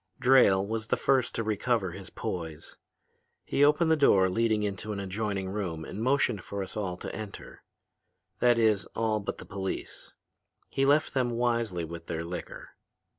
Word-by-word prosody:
"Drayle 120 Hz, -7 st, +5 dB
was 110 Hz, +1 st, -3 dB
the -, -, +1 dB
first 130 Hz, -3 st, +2 dB
to 115 Hz, -, 0 dB
recover 110 Hz, -2 st, 0 dB
his 95 Hz, +1 st, -9 dB
poise. 80 Hz, -4 st, -6 dB, 0.7 s
He 140 Hz, -, +2 dB
opened 150 Hz, +3 st, +4 dB
a -, -, +6 dB
door 95 Hz, -11 st, +5 dB
leading 110 Hz, +1 st, +1 dB
into 100 Hz, +1 st, -3 dB
an 100 Hz, -, -3 dB
adjoining 100 Hz, 0 st, -3 dB
room 90 Hz, -6 st, -3 dB
and 105 Hz, -, -6 dB
motioned 125 Hz, -5 st, +1 dB
for 100 Hz, -1 st, -4 dB
us 95 Hz, -, -9 dB
all 95 Hz, -4 st, -3 dB
to -, -, -6 dB
enter. 105 Hz, -1 st, -8 dB, 0.8 s
That 120 Hz, -1 st, +4 dB
is, 110 Hz, -4 st, +2 dB
all 110 Hz, -1 st, +1 dB
but 100 Hz, -, -4 dB
the -, -, -10 dB
police. 95 Hz, -1 st, -5 dB, 0.5 s
He 135 Hz, 0 st, +1 dB
left 145 Hz, +2 st, +3 dB
them 130 Hz, -2 st, +1 dB
wisely 115 Hz, -7 st, 0 dB
with 85 Hz, 0 st, -9 dB
their 85 Hz, -1 st, -3 dB
liquor. 85 Hz, +1 st, -7 dB
105 Hz, 170 wpm, -29 LUFS, 95-120 Hz, 0.8 s, a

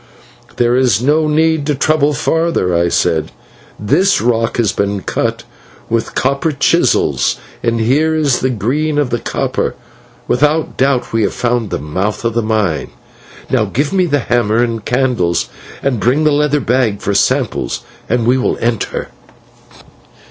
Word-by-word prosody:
"There 120 Hz, 0 st, +2 dB
is 125 Hz, -6 st, +3 dB
no 150 Hz, +5 st, +2 dB
need 155 Hz, -1 st, +1 dB
to 150 Hz, -, +1 dB
trouble 150 Hz, +1 st, +2 dB
further," 160 Hz, -, 0 dB
I 85 Hz, 0 st, +2 dB
said, 80 Hz, -2 st, 0 dB, 0.5 s
"this 185 Hz, -, +2 dB
rock 115 Hz, 0 st, 0 dB
has 115 Hz, -5 st, +2 dB
been 100 Hz, 0 st, -2 dB
cut -, -, -2 dB, 0.5 s
with 115 Hz, 0 st, -1 dB
copper 140 Hz, +5 st, 0 dB
chisels, 140 Hz, -1 st, +1 dB, 0.3 s
for 120 Hz, -, +2 dB
here 135 Hz, +8 st, +1 dB
is 145 Hz, -5 st, +1 dB
the 130 Hz, -, 0 dB
green 140 Hz, +7 st, -1 dB
of 145 Hz, -4 st, 0 dB
the 120 Hz, -, 0 dB
copper. -, -, -2 dB, 0.5 s
Without 150 Hz, +5 st, +1 dB
doubt 135 Hz, -3 st, 0 dB
we 115 Hz, -, +2 dB
have 100 Hz, -, 0 dB
found 120 Hz, -3 st, -1 dB
the -, -, -2 dB
mouth 95 Hz, +10 st, -3 dB
of 115 Hz, -, 0 dB
the 115 Hz, -, +1 dB
mine. 105 Hz, -9 st, -1 dB, 0.6 s
Now -, -, +2 dB
give 145 Hz, +7 st, -2 dB
me 185 Hz, -2 st, +2 dB
the 145 Hz, -3 st, +1 dB
hammer 115 Hz, -3 st, +1 dB
and 115 Hz, -3 st, -2 dB
candles, 125 Hz, -10 st, 0 dB, 0.3 s
and 135 Hz, -5 st, 0 dB
bring 130 Hz, +8 st, +2 dB
the 155 Hz, -, +3 dB
leather 150 Hz, 0 st, +2 dB
bag 120 Hz, -4 st, +1 dB
for 105 Hz, -2 st, -2 dB
samples, -, -, 0 dB, 0.3 s
and 120 Hz, 0 st, +1 dB
we 125 Hz, +2 st, +3 dB
will -, -, 0 dB
enter." 115 Hz, -2 st, -2 dB
125 Hz, 155 wpm, -15 LUFS, 110-145 Hz, 0.6 s, is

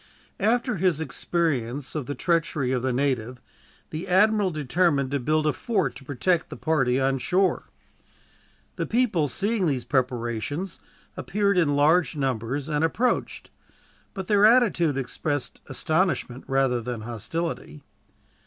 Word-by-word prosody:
After 235 Hz, +2 st, +1 dB
his 175 Hz, -3 st, +1 dB
experience 140 Hz, -4 st, -2 dB
of 150 Hz, -5 st, -4 dB
the 145 Hz, -, -3 dB
treachery 165 Hz, -6 st, 0 dB
of 130 Hz, -2 st, 0 dB
the 130 Hz, +1 st, 0 dB
native, 125 Hz, -2 st, -1 dB, 0.5 s
the 165 Hz, +5 st, -5 dB
admiral 205 Hz, +2 st, +4 dB
determined 150 Hz, -2 st, +1 dB
to 140 Hz, -, 0 dB
build 155 Hz, +4 st, +1 dB
a 150 Hz, -, +2 dB
fort 190 Hz, -, -1 dB
to -, -, -12 dB
protect 160 Hz, +6 st, 0 dB
the -, -, -8 dB
party 135 Hz, -6 st, +1 dB
on 135 Hz, 0 st, +1 dB
shore. 185 Hz, +7 st, +1 dB, 1.1 s
The -, -, -2 dB
people, 220 Hz, -10 st, +1 dB
seeing 200 Hz, -, 0 dB
these 130 Hz, -5 st, -1 dB
preparations, 130 Hz, -, -2 dB, 0.4 s
appeared 200 Hz, 0 st, 0 dB
in 145 Hz, -4 st, +2 dB
large 160 Hz, +4 st, +3 dB
numbers 135 Hz, 0 st, -2 dB
and 150 Hz, 0 st, 0 dB
approached, 235 Hz, +10 st, -1 dB, 0.6 s
but 190 Hz, -2 st, -4 dB
their 205 Hz, +1 st, +3 dB
attitude 210 Hz, -, +4 dB
expressed 135 Hz, +2 st, -3 dB
astonishment 160 Hz, -6 st, -1 dB
rather 135 Hz, -2 st, +1 dB
than 120 Hz, -1 st, -5 dB
hostility. 120 Hz, -, -5 dB
150 Hz, 135 wpm, -25 LUFS, 130-185 Hz, 1.1 s, admiral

